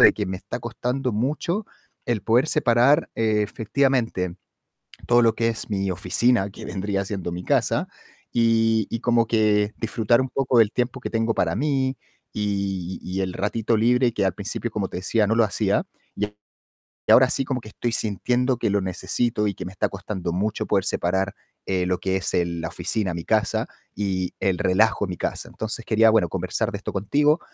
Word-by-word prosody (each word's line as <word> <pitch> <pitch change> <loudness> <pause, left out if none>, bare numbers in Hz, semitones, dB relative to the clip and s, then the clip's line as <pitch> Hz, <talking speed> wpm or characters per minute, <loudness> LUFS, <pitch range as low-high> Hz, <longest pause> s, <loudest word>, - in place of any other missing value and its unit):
de - - +8
que 105 - -3
me 95 - -3
está - - -6
costando 125 0 -2
mucho 155 - -1 0.4
el 120 -4 0
poder 120 +6 +3
separar, 135 +2 +3
eh, 110 -2 +2
efectivamente, 115 -5 0 0.7
todo 120 0 +5
lo 115 -1 +4
que 115 0 +1
es 115 0 -4
mi 95 -1 -1
oficina, 95 +4 +1
que - - -10
vendría 100 0 -2
siendo 95 -4 -4
mi 90 +1 -5
casa - - +1 0.4
y 115 -2 +3
y 115 - -3
como 120 -1 +2
que 105 -2 +2
disfrutar 115 +1 +2
un 130 - -1
poco 130 -3 +1
del 110 -2 +5
tiempo 125 +1 -1
que - - -5
tengo 115 0 0
para 85 +2 0
mí 135 -1 0 0.4
y 100 -3 -2
y 95 +1 -3
el 90 -1 -2
ratito 110 +3 0
libre 120 +2 +3
que 100 -3 0
al 90 - 0
principio, 105 +3 -4
como 105 -3 -2
te - - -5
decía, 105 +3 +1
no 115 - +2
lo 115 - +5
hacía. 100 - 0 0.3
Y 105 - 0 0.9
ahora 130 0 +7
sí 135 - +2
como 130 -1 -2
que 110 - -12
estoy 120 - -2
sintiendo 120 +4 0
que 110 - 0
lo 100 0 +2
necesito 105 +4 -1
y 100 - -2
que - - -7
me 95 - -7
está 95 - 0
costando 95 -3 -4
mucho 105 +4 -1
poder - - +1
separar, 95 +3 0 0.3
eh, 95 -2 0
lo 90 -1 0
que 95 0 -1
es 95 - -1
el 85 -1 0
la 80 - -2
oficina, 95 +1 -1
mi 85 -1 -5
casa 110 -1 +1 0.3
y 95 -3 -2
el 95 -2 +1
relajo, 105 +3 +2
mi 90 - -4
casa. - - -3
Entonces, 110 +1 -5
quería, 110 0 +4
bueno, 110 -6 +3
conversar - - -2
de - - -3
esto - - -6
contigo 145 - +2
110 Hz, 190 wpm, -24 LUFS, 95-120 Hz, 0.9 s, de